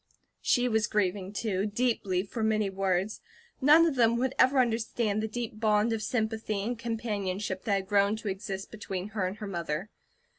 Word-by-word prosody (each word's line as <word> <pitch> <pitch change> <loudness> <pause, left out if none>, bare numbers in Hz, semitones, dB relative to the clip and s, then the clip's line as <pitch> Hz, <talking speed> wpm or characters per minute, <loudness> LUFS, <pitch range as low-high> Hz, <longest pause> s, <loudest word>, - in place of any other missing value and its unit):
She 245 0 +2
was 220 -2 +2
grieving 195 -2 0
too 205 -1 -1
deeply 205 -5 0
for 225 +3 -6
many 215 -2 +1
words; 195 +1 -1 0.4
none 305 +5 +7
of 325 - +2
them 235 -2 +3
would 260 +2 0
ever 265 +2 +5
understand 225 -3 +1
the 220 - -1
deep 225 -1 -5
bond 215 +1 +3
of 220 - -2
sympathy 220 -2 -1
and 240 +4 -2
companionship 205 -4 -3
that 210 - +1
had 190 -1 -2
grown 200 +1 +3
to 220 -1 -7
exist 195 0 -4
between 200 -2 -5
her 200 -3 -1
and 190 +3 -6
her 210 - -6
mother. 170 0 -3
215 Hz, 180 wpm, -29 LUFS, 195-230 Hz, 0.4 s, none